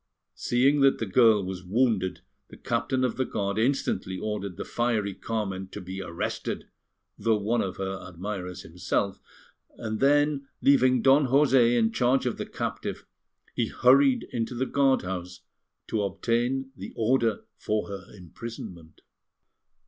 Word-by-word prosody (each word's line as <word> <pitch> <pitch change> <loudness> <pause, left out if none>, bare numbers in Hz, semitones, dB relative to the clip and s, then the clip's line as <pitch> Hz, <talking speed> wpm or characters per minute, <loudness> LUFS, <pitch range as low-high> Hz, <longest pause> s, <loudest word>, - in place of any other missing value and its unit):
Seeing 135 +4 +2
that 135 -1 +5
the 115 - -2
girl 110 -1 +4
was 95 -1 -5
wounded, 100 -1 +1 0.3
the - - -14
Captain 130 +2 -1
of 125 - 0
the 130 - +2
Guard 100 -3 -2
instantly 115 -6 0
ordered 100 -3 -4
the - - -5
fiery 110 -4 0
Carmen 95 -2 -3
to - - -8
be 95 +2 -6
arrested, 85 -2 -4 0.5
though 110 +1 +2
one 110 +4 0
of 95 - -4
her 95 0 -4
admirers 90 0 -6
himself; 90 +3 -2 0.6
and 110 -1 -4
then, 145 0 +3
leaving 130 -3 +4
Don 135 +1 +5
José 130 -3 +4
in 110 -1 +2
charge 125 +3 +2
of 125 - -1
the - - -4
captive, - - -4 0.5
he - - 0
hurried 130 +1 +4
into 120 +1 -2
the 130 +2 0
guard 135 -1 +2
house 90 -1 -5 0.4
to 110 - -1
obtain 120 +6 -1
the - - -8
order 115 -1 +1 0.2
for 105 0 -1
her 100 -1 -7
imprisonment. 90 -3 -9
115 Hz, 145 wpm, -27 LUFS, 95-130 Hz, 0.6 s, that